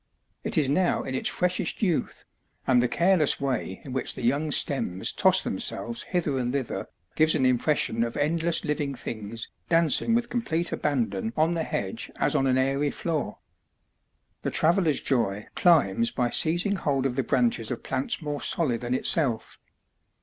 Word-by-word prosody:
It - - -1
is 150 -4 +3
now 175 +6 +1
in 130 - -5
its 130 - -1
freshest 180 +4 -1
youth, 180 -6 -1 0.4
and 125 -2 +3
the 125 - +1
careless 170 0 +2
way 125 -8 -3
in 130 - -7
which 130 - +2
the - - -7
young 140 +6 0
stems 130 -11 +1
toss - - +5
themselves 120 0 -2
hither 160 -7 -1
and 125 -1 -2
thither 135 -3 -3 0.3
gives 155 0 +3
an 135 -4 +1
impression 125 -2 +1
of 115 0 -4
endless 165 +3 +1
living 145 -2 -2
things 110 -2 -5 0.2
dancing 165 - +4
with 240 0 -1
complete 175 -9 -1
abandon 115 -7 -2
on 160 +2 +2
the 170 -1 -1
hedge 95 -10 -4
as - - 0
on 135 - +1
an 130 0 +2
airy 135 +2 +1
floor. 155 -9 -3 1.0
The - - -2
travellerŌĆÖs 165 -2 +2
joy 105 -6 -1
climbs 180 - +3
by 125 - -2
seizing 175 +5 +1
hold 140 -5 -1
of 130 -2 -1
the 135 - +1
branches 120 -3 0
of 125 - -5
plants 135 +4 -3
more 145 -1 -4
solid 130 -9 +1
than 125 +1 -2
itself. 130 -5 0
140 Hz, 165 wpm, -26 LUFS, 125-165 Hz, 1.0 s, toss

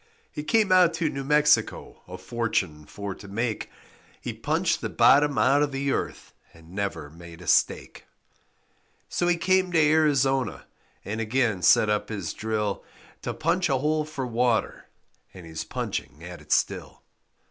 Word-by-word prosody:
He - - -5
came 205 +5 +2
out 180 -3 +5
to 165 -2 -1
New 135 - -5
Mexico 150 +1 +2
A 90 +1 -8
fortune 95 -7 -2
for 100 -1 -6
to 100 - -13
make, 110 +3 -3 0.5
He - - -5
punched - - 0
the - - -3
bottom 145 0 +4
out 140 +2 +4
of 145 -1 +1
the 135 +1 -1
earth - - -4 0.2
And 80 0 -17
never 95 -6 -4
made 85 0 -12
a 90 - -11
stake. - - +1 1.0
So 175 - 0
he 175 -1 +2
came 185 +1 +2
to 165 - +4
Arizona 135 - +2 0.4
And 110 +2 -3
again 115 -3 0
set 105 - +5
up 105 0 -1
his 100 -7 -4
drill 105 -2 -2 0.4
To - - -3
punch 165 +3 0
a 135 - +2
hole 155 +3 0
for 145 -3 -5
water, 120 -1 0 0.5
And 90 -2 -11
he's 80 -1 -6
punching 70 +4 -5
at 90 0 -9
it - - -15
still. - - -1
125 Hz, 160 wpm, -25 LUFS, 100-150 Hz, 1.0 s, out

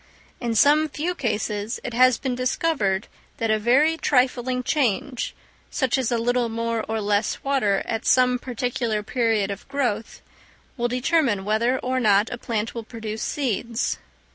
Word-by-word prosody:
In 235 -2 -2
some 300 +6 +5
few 320 +5 -2
cases 220 -5 -2
it 245 - -5
has 255 0 +5
been 260 -2 -2
discovered 245 -6 0 0.3
that 225 -1 0
a 215 - +2
very 280 +9 +3
trifling 250 -3 +1
change, 250 -2 -1 0.3
such 260 -3 0
as 260 -4 0
a 240 - +2
little 240 +1 +1
more 230 0 -2
or 220 0 -1
less 205 0 0
water 260 -8 +1
at 225 0 -3
some 250 -1 +4
particular 240 -3 -2
period 220 -4 0
of 200 - -8
growth, 245 -6 -2 0.5
will 240 -3 0
determine 250 -4 +1
whether 230 +5 +1
or 255 0 -1
not 210 -2 +3
a 245 - -5
plant 225 -2 -2
will 230 - -5
produce 220 -1 -6
seeds. 235 -3 -1
240 Hz, 155 wpm, -24 LUFS, 220-255 Hz, 0.5 s, some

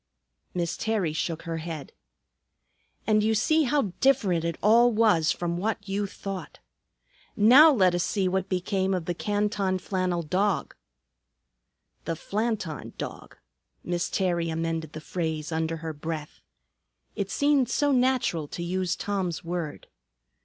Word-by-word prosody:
Miss 170 -2 -1
Terry 210 -8 0
shook 160 +1 -3
her 165 -1 -3
head. 160 -3 -6 1.1
"And 215 -1 +3
you 220 +1 +2
see 310 +8 +3
how 250 -8 +1
different 195 -11 +3
it 170 -1 -2
all 235 +3 +6
was 210 -8 +3
from 170 -1 -2
what 205 +1 -2
you 200 +1 -1
thought. 195 -3 -7 0.8
Now 265 +10 +8
let 190 -9 +4
us 175 -1 +1
see 195 0 0
what 185 0 -1
became 190 +1 0
of 175 -3 -3
the 175 - -1
Canton 205 0 0
flannel 185 -2 -1
dog." 195 +6 0 1.3
"The 165 - -2
Flanton 205 - -3
Dog." - - -7 0.5
Miss 175 0 -1
Terry 175 -3 0
amended 165 -1 -3
the 155 - -7
phrase 160 -2 -3
under 160 0 -1
her 160 - -3
breath. 155 0 -6 0.7
It 200 -2 -2
seemed 285 -2 +2
so 290 +1 +2
natural 250 - +1
to 170 - -6
use 180 0 -1
Tom's 190 -5 -2
word. 170 -3 -4
185 Hz, 140 wpm, -27 LUFS, 165-210 Hz, 1.3 s, Now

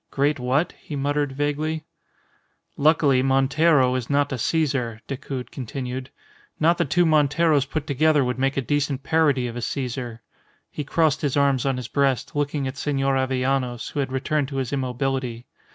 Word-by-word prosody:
"Great 145 +1 +1
what?" 130 +7 +1
he 150 - -7
muttered, 145 0 0
vaguely. 150 +2 -1 0.9
"Luckily, 145 -3 +3
Montero 135 +1 +3
is 125 -2 -3
not 145 0 +2
a - - -2
Caesar," 130 -6 0
Decoud 135 -1 -6
continued. 130 0 -5 0.5
"Not 165 +2 +3
the - - +2
two 175 +5 +2
Monteros 150 -1 +3
put 150 +2 -3
together 150 +1 +3
would 125 +1 -2
make 135 +1 0
a - - +2
decent 140 0 -1
parody 145 -5 +2
of 120 -1 -5
a 120 - -4
Caesar." 120 -2 -4 0.5
He 150 - -4
crossed 155 +1 +1
his 145 -2 0
arms 140 -2 +2
on 135 -2 0
his 125 -3 -5
breast, 140 -1 0
looking 145 -1 -1
at 130 +1 -6
Senor 135 -2 0
Avellanos, 130 -2 -1
who - - -4
had 135 -2 -1
returned 135 +2 0
to 140 - -7
his 135 -1 -2
immobility. 130 -2 -2
135 Hz, 170 wpm, -23 LUFS, 130-145 Hz, 0.9 s, Luckily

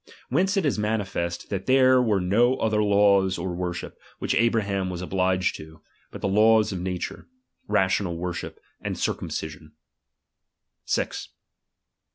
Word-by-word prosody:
Whence 190 - +1
it 190 - +1
is 135 -7 0
manifest, 100 -5 -2
that 95 -1 -3
there 130 -1 +5
were 110 -5 +2
no 115 +8 +3
other 110 -3 +1
laws 100 -2 +3
or 90 +1 -3
worship, 90 0 -5 0.2
which - - -1
Abra 115 -1 +2
ham 100 -2 -2
was 90 0 -5
obliged 95 0 0
to, 80 0 -12 0.3
but - - -10
the - - 0
laws 110 +2 +4
of 95 - -4
nature, 90 -1 -4 0.4
ra 105 -2 +3
tional 95 -2 -1
worship, 90 0 -5 0.2
and - - -4
circumcision. 80 0 -4 1.1
"K - - +2
6. - - -8
100 Hz, 150 wpm, -25 LUFS, 90-110 Hz, 1.1 s, there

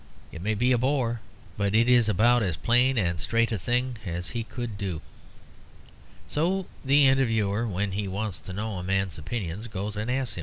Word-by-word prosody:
It 80 - -8
may 105 +3 0
be 125 +5 +2
a 125 - +3
bore; 125 -3 +1 0.4
but 100 0 0
it 115 +2 +4
is 120 -3 +5
about 120 +5 +4
as 90 -7 -1
plain 125 +7 +3
and 85 -5 +1
straight 115 +6 +1
a 110 - -1
thing 125 +4 -1
as 90 -2 -4
he 115 -1 -3
could 120 -1 -5
do. 95 -6 -3 1.3
So 180 +5 0 0.2
the 140 +1 +5
interviewer, 115 -5 +2
when 100 0 -1
he 100 +1 -2
wants 100 0 -3
to 95 - -8
know 105 +1 -3
a - - -6
man's 95 -3 -1
opinions, 100 +4 -4
goes 105 -1 -4
and 105 +3 -3
asks 125 -6 -1
him. - - -4
110 Hz, 195 wpm, -27 LUFS, 95-120 Hz, 1.3 s, is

